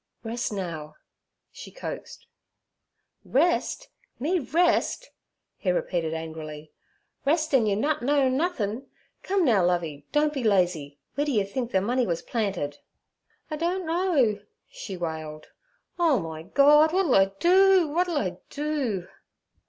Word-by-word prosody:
'Rest 235 Hz, +1 st, -3 dB
now' 165 Hz, -6 st, -5 dB, 0.6 s
she -, -, -10 dB
coaxed. -, -, -8 dB, 1.0 s
'Rest! 345 Hz, -, +1 dB, 0.3 s
Me 340 Hz, +8 st, 0 dB
rest!' 345 Hz, -, +1 dB, 0.5 s
he 190 Hz, -, -2 dB
repeated 175 Hz, -2 st, -1 dB
angrily—'rest, 160 Hz, -, -5 dB
an' 240 Hz, -5 st, +4 dB
you 200 Hz, -, +2 dB
nut 285 Hz, +5 st, 0 dB
knowin' 270 Hz, 0 st, +2 dB
nuthin'? 265 Hz, -, -2 dB, 0.3 s
Come 380 Hz, -2 st, +1 dB
now, 215 Hz, -8 st, +4 dB
Lovey, 165 Hz, -5 st, -1 dB
don't 295 Hz, 0 st, +2 dB
be 270 Hz, -4 st, -3 dB
lazy: 175 Hz, -9 st, +1 dB, 0.2 s
weer 290 Hz, -, 0 dB
d'ye 240 Hz, -9 st, +1 dB
think 235 Hz, +5 st, -4 dB
ther 190 Hz, -, +2 dB
money 245 Hz, +4 st, 0 dB
wuz 170 Hz, -1 st, -2 dB
planted?' 195 Hz, -11 st, -2 dB, 0.7 s
'I -, -, -1 dB
don't 350 Hz, +3 st, -1 dB
know' 320 Hz, -, +1 dB, 0.3 s
she 195 Hz, -4 st, -8 dB
wailed. 155 Hz, -2 st, -5 dB, 0.5 s
'Oh, 325 Hz, -6 st, +4 dB
my 160 Hz, -2 st, -6 dB
Gord! 290 Hz, -, +5 dB
w'at 375 Hz, +4 st, +1 dB
'll 275 Hz, -, +2 dB
I 195 Hz, -, +6 dB
do? 375 Hz, -1 st, +5 dB
W'at 350 Hz, +5 st, +1 dB
'll 340 Hz, -4 st, -1 dB
I 180 Hz, -9 st, -2 dB
do?' 280 Hz, -, -2 dB
240 Hz, 135 wpm, -26 LUFS, -, 1.0 s, I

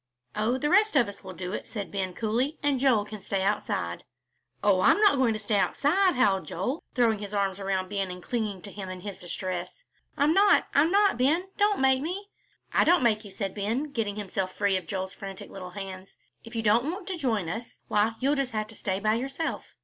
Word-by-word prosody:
"Oh, 220 Hz, +4 st, +1 dB
the 295 Hz, +3 st, 0 dB
rest 420 Hz, 0 st, +4 dB
of 245 Hz, -6 st, +5 dB
us 200 Hz, -, -9 dB
will 190 Hz, -1 st, -8 dB
do 180 Hz, +2 st, -5 dB
it," -, -, -5 dB
said 205 Hz, -4 st, -5 dB
Ben, 190 Hz, -2 st, -3 dB
coolly, 240 Hz, +7 st, 0 dB
"and 285 Hz, -2 st, +2 dB
Joel 245 Hz, -6 st, +3 dB
can 210 Hz, -1 st, -8 dB
stay 195 Hz, 0 st, -1 dB
outside." 95 Hz, -, -1 dB, 0.6 s
"Oh, 195 Hz, -3 st, +4 dB
I'm -, -, +5 dB
not 415 Hz, -8 st, +5 dB
going 250 Hz, -4 st, +3 dB
to 215 Hz, -, -4 dB
stay 210 Hz, 0 st, 0 dB
outside," 360 Hz, -, +2 dB
howled 200 Hz, -7 st, +2 dB
Joel, 250 Hz, -, -3 dB
throwing 230 Hz, -4 st, +3 dB
his 205 Hz, 0 st, -5 dB
arms 195 Hz, -1 st, 0 dB
around 190 Hz, -1 st, -1 dB
Ben 195 Hz, -1 st, -2 dB
and 180 Hz, 0 st, -8 dB
clinging 215 Hz, -6 st, -3 dB
to 200 Hz, -, -7 dB
him 195 Hz, -2 st, -7 dB
in 185 Hz, -1 st, -7 dB
his 200 Hz, -1 st, -6 dB
distress. 180 Hz, -, -5 dB, 0.3 s
"I'm 295 Hz, +3 st, +4 dB
not. 405 Hz, +2 st, +5 dB
I'm 295 Hz, +3 st, +4 dB
not, 400 Hz, -, +3 dB
Ben, 325 Hz, +9 st, +2 dB
don't 410 Hz, 0 st, +3 dB
make 265 Hz, 0 st, +4 dB
me." 380 Hz, +6 st, -4 dB, 0.4 s
"I -, -, +5 dB
don't 345 Hz, -3 st, +4 dB
make 220 Hz, -2 st, +2 dB
you," 205 Hz, -, -10 dB
said 195 Hz, 0 st, -4 dB
Ben, 230 Hz, +9 st, -2 dB
getting 220 Hz, -6 st, -2 dB
himself 190 Hz, -2 st, -3 dB
free 200 Hz, -1 st, +2 dB
from 185 Hz, -3 st, -3 dB
Joel's 190 Hz, -1 st, -3 dB
frantic 195 Hz, -1 st, -8 dB
little 185 Hz, -2 st, -7 dB
hands; 190 Hz, 0 st, -8 dB, 0.3 s
"if 230 Hz, +1 st, -11 dB
you 225 Hz, -, -1 dB
don't 230 Hz, +8 st, +3 dB
want 375 Hz, +1 st, -7 dB
to 375 Hz, -, -2 dB
join 225 Hz, -, 0 dB
us, 225 Hz, +8 st, -6 dB
why, 210 Hz, +2 st, +2 dB
you'll 275 Hz, +3 st, +2 dB
just 275 Hz, -4 st, -1 dB
have 215 Hz, 0 st, -2 dB
to 225 Hz, -, -12 dB
stay 190 Hz, -2 st, -2 dB
by 215 Hz, +1 st, +2 dB
yourself." 270 Hz, +7 st, -3 dB
215 Hz, 225 wpm, -27 LUFS, 195-275 Hz, 0.6 s, of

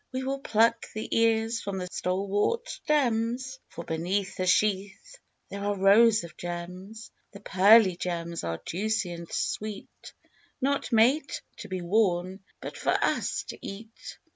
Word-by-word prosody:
We 260 Hz, 0 st, -3 dB
will 270 Hz, +1 st, -2 dB
pluck 230 Hz, -2 st, +2 dB
the 215 Hz, -, -3 dB
ears 225 Hz, 0 st, +2 dB
from 200 Hz, -1 st, -4 dB
the 180 Hz, -, -3 dB
stalwart 200 Hz, -, -1 dB
stems, 255 Hz, -, -1 dB
For -, -, -8 dB
beneath 185 Hz, +5 st, -2 dB
the 185 Hz, -, -2 dB
sheath 205 Hz, -, 0 dB, 0.3 s
there 200 Hz, 0 st, -6 dB
are 205 Hz, 0 st, -1 dB
rows 215 Hz, +3 st, +5 dB
of 170 Hz, -, -10 dB
"gems," 180 Hz, +5 st, -7 dB, 0.2 s
The 200 Hz, -, -10 dB
pearly 200 Hz, 0 st, +5 dB
gems 170 Hz, -1 st, -4 dB
are 85 Hz, -1 st, -3 dB
juicy 205 Hz, 0 st, -1 dB
and 170 Hz, -1 st, -8 dB
sweet, 210 Hz, -1 st, -5 dB, 0.4 s
Not 280 Hz, 0 st, -1 dB
made 255 Hz, +6 st, +3 dB, 0.3 s
to 210 Hz, -, -8 dB
be 185 Hz, -2 st, -4 dB
worn, 185 Hz, -1 st, +1 dB, 0.2 s
but -, -, -7 dB
for -, -, -1 dB
us -, -, 0 dB
to -, -, -7 dB
eat. 220 Hz, +3 st, -9 dB
205 Hz, 145 wpm, -27 LUFS, 185-230 Hz, 0.4 s, rows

